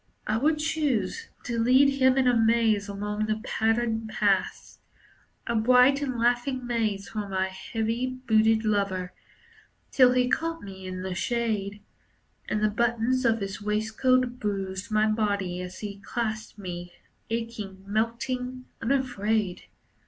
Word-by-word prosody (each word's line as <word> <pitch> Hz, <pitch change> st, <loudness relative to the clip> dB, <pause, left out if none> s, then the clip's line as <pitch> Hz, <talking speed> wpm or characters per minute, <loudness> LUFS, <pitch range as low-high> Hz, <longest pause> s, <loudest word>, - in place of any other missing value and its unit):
I 215 Hz, -, 0 dB
would 300 Hz, +7 st, +2 dB
choose 300 Hz, -, -1 dB
To 235 Hz, -2 st, -2 dB
lead 270 Hz, +4 st, +4 dB
him 260 Hz, 0 st, +5 dB
in 260 Hz, -1 st, +3 dB
a 245 Hz, -, +4 dB
maze 225 Hz, -2 st, +3 dB
along 210 Hz, +1 st, -3 dB
the 215 Hz, 0 st, -1 dB
patterned 225 Hz, 0 st, 0 dB
paths, 205 Hz, -3 st, 0 dB, 0.7 s
A 235 Hz, -, -1 dB
bright 250 Hz, +5 st, +5 dB
and 260 Hz, -4 st, -2 dB
laughing 245 Hz, +2 st, +1 dB
maze 220 Hz, -5 st, -1 dB
for 210 Hz, -2 st, -4 dB
my 190 Hz, 0 st, 0 dB
heavy 225 Hz, +5 st, -2 dB
booted 225 Hz, -3 st, +2 dB
lover, 195 Hz, -4 st, 0 dB, 0.8 s
Till 250 Hz, -2 st, +6 dB
he 250 Hz, 0 st, +3 dB
caught 330 Hz, +5 st, -1 dB
me 190 Hz, -1 st, -9 dB
in 185 Hz, 0 st, -5 dB
the 190 Hz, -1 st, -3 dB
shade, 210 Hz, -1 st, -2 dB, 0.7 s
And 215 Hz, 0 st, 0 dB
the 215 Hz, -, +4 dB
buttons 235 Hz, +3 st, +1 dB
of 225 Hz, -1 st, +2 dB
his 195 Hz, +1 st, -4 dB
waistcoat 240 Hz, +4 st, +1 dB
bruised 195 Hz, 0 st, -3 dB
my 215 Hz, 0 st, +3 dB
body 200 Hz, -4 st, 0 dB
as 180 Hz, 0 st, -8 dB
he 200 Hz, -2 st, -6 dB
clasped 220 Hz, 0 st, -4 dB
me, 175 Hz, -3 st, -7 dB, 0.4 s
Aching, 225 Hz, -4 st, -4 dB
melting, 250 Hz, +4 st, -2 dB, 0.2 s
unafraid. 220 Hz, -6 st, 0 dB
220 Hz, 135 wpm, -27 LUFS, 205-250 Hz, 0.8 s, Till